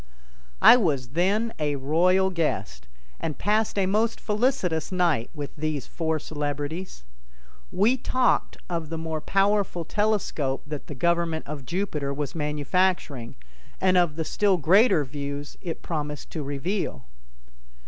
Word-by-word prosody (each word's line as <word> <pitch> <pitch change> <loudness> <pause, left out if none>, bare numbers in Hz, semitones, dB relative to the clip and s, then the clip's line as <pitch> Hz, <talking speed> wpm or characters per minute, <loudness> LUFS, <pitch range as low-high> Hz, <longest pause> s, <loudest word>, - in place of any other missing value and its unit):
I - - +10
was 145 - 0
then 200 - +1
a 150 -1 0
royal 180 +7 +3
guest, 65 - -2 0.3
and 155 -3 -3
passed 215 0 +1
a 195 - +3
most 220 +4 +1
felicitous 210 - 0
night 170 -10 +1
with 145 -2 -6
these 155 -3 -2
four 160 -1 -1
celebrities. 145 - -4 0.7
We 215 +8 +3
talked 255 0 +1
of 165 -3 -3
the 165 - -3
more 160 -1 -3
powerful 195 -2 +1
telescope 200 -10 0
that 150 -1 -6
the 145 - -7
government 170 +1 0
of 140 -3 -7
Jupiter 170 -7 -2
was 145 -1 -3
manufacturing, 150 -3 -1 0.4
and 185 -1 +3
of 175 -4 +3
the 160 0 -2
still 200 +1 +2
greater 175 - +4
views 145 +1 -6
it 170 -4 -5
promised 150 -3 -4
to 160 - -4
reveal. 145 - -3
165 Hz, 135 wpm, -26 LUFS, 145-190 Hz, 0.7 s, I